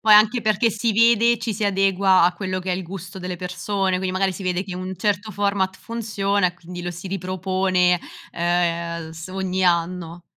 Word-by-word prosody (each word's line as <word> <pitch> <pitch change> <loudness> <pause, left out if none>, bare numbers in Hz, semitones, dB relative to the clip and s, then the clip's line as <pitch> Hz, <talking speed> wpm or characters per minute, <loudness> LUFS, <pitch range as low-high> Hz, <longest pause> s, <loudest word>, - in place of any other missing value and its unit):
poi 215 -1 +6
anche 220 +3 +5
perché 215 +2 +2
si 225 +2 0
vede, 230 +1 +4
ci 230 -1 -2
si 210 +1 -5
adegua 195 -1 +3
a 175 +1 +4
quello 185 +1 -3
che 185 0 -2
è - - +1
il 185 - -4
gusto 190 +1 -8
delle 180 -1 -5
persone, 185 +2 -1
quindi 185 0 -2
magari 190 0 +1
si 195 - -8
vede 185 +1 -1
che 185 - -6
un 185 +1 -5
certo 205 +3 -1
format 200 -1 0
funziona 205 -4 -1
e 180 - -2
quindi 175 0 -9
lo 175 - -3
si 175 +2 -8
ripropone, 185 -1 +1 0.3
ehm, 170 -1 -1
s 160 +1 -8
ogni 190 0 -2
anno. 170 0 0
185 Hz, 195 wpm, -22 LUFS, 180-200 Hz, 0.3 s, poi